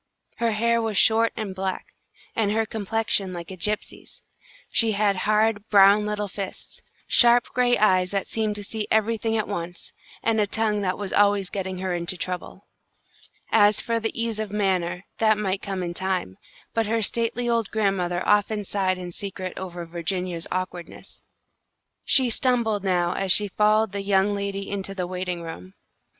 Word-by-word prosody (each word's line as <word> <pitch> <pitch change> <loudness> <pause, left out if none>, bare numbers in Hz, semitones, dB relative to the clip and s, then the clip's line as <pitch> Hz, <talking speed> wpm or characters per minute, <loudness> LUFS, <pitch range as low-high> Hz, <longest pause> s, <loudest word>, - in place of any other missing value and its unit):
Her 230 -1 +1
hair 235 +2 +2
was 220 -3 -2
short 225 +2 +4
and 215 -4 -4
black, 190 0 -4 0.4
and 215 -3 +1
her 220 +1 +1
complexion 215 -2 -1
like 170 +1 -7
a - - -6
gypsy's. 210 +4 -3 0.5
She 225 -2 +3
had 200 -1 +2
hard, 215 0 +2
brown 205 +1 +6
little 210 0 -2
fists, 195 0 -8 0.3
sharp 240 0 +6
gray 245 -1 +3
eyes 185 -3 +3
that 195 0 -1
seemed 215 -2 -1
to 205 - -2
see 215 +1 -4
everything 225 +1 +1
at 215 - -1
once, 175 -3 -6 0.3
and 225 -1 +2
a 205 - +1
tongue 215 0 0
that 185 -2 -1
was 200 -2 -5
always 200 -2 +3
getting 190 -2 -3
her 185 0 -2
into 175 +1 -2
trouble. 180 0 -6 0.9
As 210 -1 +5
for 230 0 0
the 225 0 -1
ease 230 -2 -1
of 215 -1 -3
manner, 185 -3 -1
that 215 -1 +4
might 195 -2 -1
come 195 -2 -3
in 175 -1 -4
time, 185 - -2 0.3
but 225 -2 0
her 225 +1 0
stately 235 +2 0
old 230 -3 +1
grandmother 190 -4 -1
often 210 0 +2
sighed 190 -2 0
in 180 -1 -7
secret 185 0 -5
over 175 -2 -6
Virginia's 170 0 -3
awkwardness. 180 -1 -6 0.8
She 255 -3 +4
stumbled 225 -4 +1
now 180 -2 +1
as 195 -1 +1
she 205 +3 +4
followed 215 +1 +2
the 200 0 -3
young 195 0 +2
lady 200 0 -3
into 195 -1 -4
the 180 -2 -2
waiting 180 -1 -4
room. 95 - -9
200 Hz, 170 wpm, -24 LUFS, 185-220 Hz, 0.9 s, brown